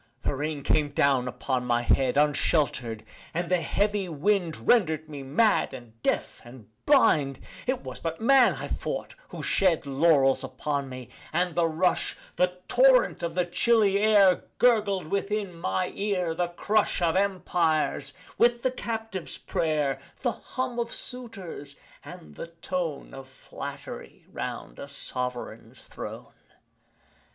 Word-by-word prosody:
The - - 0
rain 145 +1 -3
came 150 0 +2
down 140 -3 +2
upon 130 0 -2
my 120 0 +2
head 130 +1 +2
Unshelter'd 140 -6 +1 0.3
and 175 +1 -2
the 180 -2 +3
heavy 200 +4 0
wind 165 - 0
Rendered 160 -9 +3
me 145 -2 -7
mad 155 +7 +2
and 115 -3 -13
deaf - - -1
and 120 -2 -13 0.2
blind. 150 - +4 0.3
It 260 0 0
was - - -7
but 165 -1 -4
man, 255 +1 +5
I - - -5
thought, - - -4
who - - -8
shed 180 -6 +2
Laurels 140 -1 +3
upon 135 +2 -3
me: 130 -2 -8 0.2
and 175 +2 0
the 170 +1 +2
rush 165 +3 0 0.2
The 180 0 +1
torrent - - +4
of 170 -1 -3
the 180 -1 +2
chilly 200 +2 +3
air 205 -3 +5
Gurgled 210 -7 +3
within 200 +2 -2
my 95 - -2
ear 190 -5 -1
the 175 +2 0
crush 205 +5 0
Of 170 -1 +1
empires 170 -7 +1 0.3
with 240 0 +3
the 255 - +2
captive's 225 -6 -5
prayer 150 -4 -1 0.2
The 245 - +2
hum 255 -1 -4
of 235 0 -2
suitors 195 - -7 0.3
and 75 - -11
the 120 - -7
tone 170 -2 -4
Of 135 0 -9
flattery 130 - -9
'round - - -6
a - - -7
sovereign's 125 -4 -5
throne. - - -8
165 Hz, 140 wpm, -27 LUFS, 140-200 Hz, 0.3 s, man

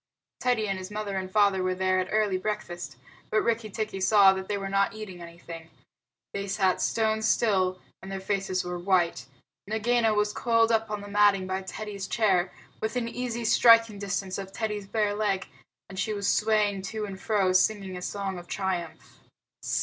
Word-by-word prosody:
Teddy 245 -4 +1
and 195 -1 -2
his 185 0 -7
mother 210 -1 -4
and 185 -1 -3
father 200 -2 +3
were 185 0 0
there 185 0 +1
at 185 - -1
early 210 -3 +1
breakfast, 185 -4 -4 0.3
but 215 - +2
Rikki 225 -1 0
tikki 210 -2 -4
saw 195 0 +6
that 190 0 -5
they 205 - -1
were 195 0 -4
not 195 +1 +1
eating 195 -5 -8
anything. 170 -1 -10 0.6
They 200 0 -3
sat 190 -1 +1
stone 220 -1 +1
still, 190 -4 +2 0.2
and 190 - -9
their 195 - -3
faces 190 -1 -1
were 180 0 -4
white. 175 -8 +1 0.4
Nagaina 220 +1 +2
was 210 0 +1
coiled 230 -1 +2
up 225 -1 +1
on 210 -1 -3
the 205 - -9
matting 205 -2 +3
by 190 +1 -2
Teddy's 200 0 -6
chair, 190 -6 +2 0.3
within 230 +2 -1
easy 235 -1 -4
striking 230 -2 +5
distance 195 -1 -3
of 195 -1 -7
Teddy's 210 -1 -3
bare 210 0 0
leg, 205 -2 0 0.4
and 190 -1 -8
she 215 - -1
was 200 -1 -2
swaying 210 -2 +2
to 215 +2 -4
and 195 -2 -8
fro, 195 -4 +1
singing 190 0 +1
a 180 - -6
song 195 -1 -4
of 175 - -13
triumph. 185 -4 -4
200 Hz, 180 wpm, -27 LUFS, 190-215 Hz, 0.6 s, saw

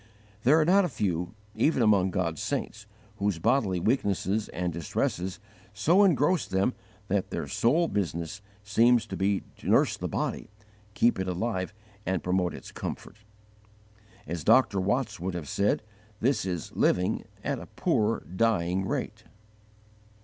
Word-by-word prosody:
There 140 +8 +5
are 155 - +3
not 195 +4 +5
a 180 - 0
few, 90 - -2 0.2
even 125 +3 +2
among 100 -4 +4
God's 85 -3 -2
saints, 110 -2 -3 0.3
whose 100 -3 0
bodily 105 -1 +1
weaknesses 100 -1 0
and 90 -1 -3
distresses 90 +3 -2 0.4
so 170 - +4
engross 175 -1 +3
them 95 +6 +1 0.3
that 100 -1 0
their - - -4
sole 160 +9 +2
business 85 - -3 0.2
seems 115 +3 +4
to - - -6
be 100 0 0
to - - -6
nurse - - +4
the - - -3
body, - - -3 0.5
keep 120 -4 +3
it 95 - -2
alive 95 +1 -2 0.3
and 95 -4 -1
promote 90 -1 0
its - - -10
comfort. 100 - -6 1.1
As 85 0 -4
Dr. 115 -3 +4
Watts 110 +5 -1
would 90 +1 -3
have 80 -4 -5
said, 100 +6 +1 0.4
this 120 -5 +1
is 90 -4 -4
living 90 0 +2 0.2
"at - - -1
a - - -10
poor 110 +1 0
dying 95 -1 0
rate." - - -4
100 Hz, 145 wpm, -28 LUFS, 90-115 Hz, 1.1 s, There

